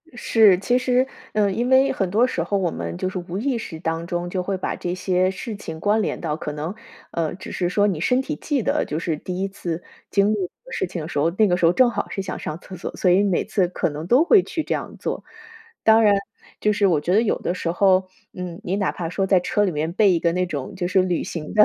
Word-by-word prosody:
是， 220 -5 +5
其 220 +7 +1
实 255 0 +2 0.3
呃， 205 -2 +2
因 240 +6 -1
为 265 +1 +5
很 195 -8 -1
多 220 +6 +4
时 175 -10 -2
候 200 +4 0
我 180 -4 0
们 85 0 -5
就 - - -2
是 185 - -5
无 175 +1 -6
意 255 +3 0
识 165 -8 -7
当 165 0 -2
中 175 0 -3
就 185 0 -2
会 195 +1 -2
把 185 - -3
这 175 - -3
些 185 0 +1
事 215 +3 -6
情 160 -5 -7
关 210 +5 +2
联 - - -2
到 150 - -2
可 155 -1 -5
能， 155 +5 -4 0.4
呃， 165 -2 -1
只 185 - -9
是 175 -1 -1
说 205 +3 +2
你 175 -6 -1
身 250 +9 +2
体 300 +3 -4
记 290 -3 -1
得， - - +1
就 150 - -3
是 165 -1 -1
第 180 +4 -5
一 195 - 0
次 175 -3 -5 0.3
经 200 +1 +3
历 190 -4 -2 0.2
事 225 - -1
情 175 -1 -5
的 155 - -5
时 175 - -5
候， 160 +3 +2
那 215 - +5
个 180 - +2
时 180 - +2
候 165 - +6
正 250 +6 +4
好 - - -3
是 195 - -3
想 190 -1 -5
上 155 +2 -5
厕 185 - -10
所， 175 - -6
所 185 - +2
以 190 +3 +5
每 195 -4 +1
次 190 -4 +1
可 175 - -1
能 150 +2 -6
都 255 - +5
会 400 +2 +6
去 320 - -3
这 - - -2
样 - - -6
做。 - - -4 0.6
当 225 0 +6
然 205 -1 +6 0.5
就 210 - +2
是 205 -1 +2
我 165 -5 +3
觉 175 - 0
得 215 - +5
有 220 - 0
的 - - -1
时 170 -2 -2
候 185 +1 +3 0.3
嗯， 180 -1 -6
你 185 - -1
哪 195 -2 0
怕 165 -2 -4
说 190 +3 0
在 190 -1 +4
车 205 +3 0
里 195 - +1
面 155 +1 -2
备 200 0 +4
一 170 - +2
个 170 0 +2
那 180 +1 0
种 145 -6 -5
就 180 -2 -2
是 185 +1 +3
旅 180 -2 0
行 155 -3 -6
的 210 - +8
185 Hz, 290 characters per minute, -22 LUFS, 170-210 Hz, 0.6 s, 的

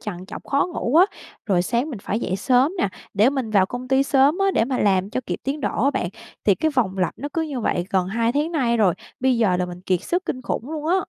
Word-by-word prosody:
trằn 185 -3 -6
trọc - - -9
khó 280 +3 +1
ngủ 255 -1 0
á, 360 - +8 0.4
rồi 185 -4 +2
sáng 240 - -1
mình 235 - -6
phải 210 +3 -3
dậy 185 - -1
sớm 255 - +3
nè, 345 - +2 0.3
để 215 +6 +4
mình 265 -6 -3
vào 195 -3 +4
công 245 +4 -6
ty 265 +1 +4
sớm 275 +4 +3
á, 390 0 +3
để 225 - +2
mà 255 +1 -2
làm 195 -1 +2
cho 255 - -2
kịp - - -3
tiến 280 +3 -2
độ 255 - -1
á 280 - +4
bạn. 175 - -2 0.4
Thì 200 - +5
cái 315 - 0
vòng 215 -9 0
lặp 180 - 0
nó 285 - -4
cứ 325 +2 0
như 285 -5 -4
vậy 175 -5 -1
gần 185 -2 +1
2 230 +3 0
tháng 300 +5 0
nay 245 -7 +1
rồi, 200 -6 +3 0.3
bây 260 -2 +2
giờ 195 -6 +3
là 180 - -1
mình 180 0 -8
kiệt 185 -2 0
sức 360 +2 -1
kinh 255 - -4
khủng 245 +4 -3
luôn 310 -1 -4
á. 345 - +3
245 Hz, 275 wpm, -22 LUFS, 195-280 Hz, 0.4 s, á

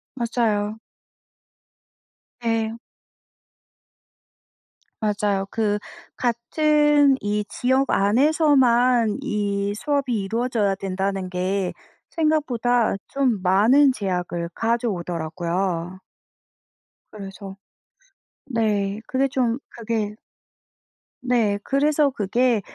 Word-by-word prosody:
맞아요. 225 -3 -1 1.6
네. 225 -1 -1 2.2
맞아요. 205 -2 0
그 210 -2 0 0.4
같은 290 +4 +3
이 205 0 -1
지역 260 +2 +1
안에서만 250 - +3
이 200 -1 -1
수업이 280 +1 -1
이루어져야 225 -1 0
된다는 195 -1 -3
게 185 +1 -1 0.4
생각보다 250 -8 +1
좀 255 -8 0
많은 235 +10 +4
제약을 180 -5 -3
가져오더라고요. 180 -4 -2 1.1
그래서 195 -1 -9 0.9
네 210 -5 -1
그게 270 -2 +1
좀 250 -3 0
그게 220 -2 -3 1.1
네. 230 -5 +1
그래서 290 +1 +2
'그게 235 0 +1
220 Hz, 165 characters per minute, -23 LUFS, 195-255 Hz, 2.2 s, 많은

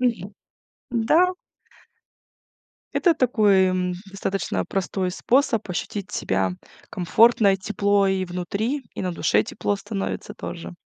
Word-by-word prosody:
Мгм. 215 -6 -1 0.6
М-да. 315 +11 +3 1.6
Это 345 -3 +3
такой, 210 -8 +3
м, 185 -1 0 0.2
достаточно 190 - -2
простой 190 -1 -2
способ 235 0 +1
ощутить 200 +3 -4
себя 95 - 0 0.4
комфортно: 205 +3 +4
и 195 - +1
тепло 200 +1 +1
и 190 -1 0
внутри, 200 +10 -3
и - - -4
на 180 -1 -2
душе 105 -10 +2
тепло 205 - -2
становится 200 0 -5
тоже. 170 - -7
195 Hz, 115 wpm, -23 LUFS, 185-225 Hz, 1.6 s, комфортно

